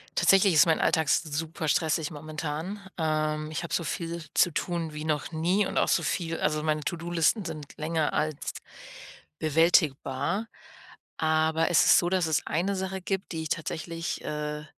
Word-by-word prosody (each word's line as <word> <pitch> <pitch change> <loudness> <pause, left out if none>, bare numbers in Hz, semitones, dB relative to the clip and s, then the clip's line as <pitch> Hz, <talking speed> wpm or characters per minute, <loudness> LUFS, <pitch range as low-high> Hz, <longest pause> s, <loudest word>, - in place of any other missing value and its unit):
tatsächlich 195 -1 +5
ist 155 - +7
mein 160 -2 +2
Alltag 160 -3 +2
super 160 +1 -1
stressig 160 +1 +1
momentan. 155 +5 -5 0.2
Ähm, 155 -1 -1
ich 155 - -3
habe 170 - -6
so 170 - +1
viel 170 +1 -4
zu 175 - +4
tun 165 -1 -3
wie 150 0 -5
noch 150 0 -1
nie 175 +6 +1
und - - -4
auch - - +3
so - - +3
viel 165 -2 -2
also, 150 0 0
meine 155 -1 0
To-Do-Listen 175 +5 0
sind 155 -4 -7
länger 155 0 -1
als 155 -2 -2 0.9
bewältigbar. 155 +2 +2 0.7
Aber 160 0 +2
es 170 - +5
ist - - +7
so, 175 - +1
dass 185 -3 +1
es 155 -4 0
eine 185 +5 0
Sache 190 0 -3
gibt, 190 0 -3
die 160 -1 -3
ich - - -5
tatsächlich, 165 0 -3
äh, 150 0 -4
160 Hz, 165 wpm, -27 LUFS, 155-170 Hz, 0.9 s, ist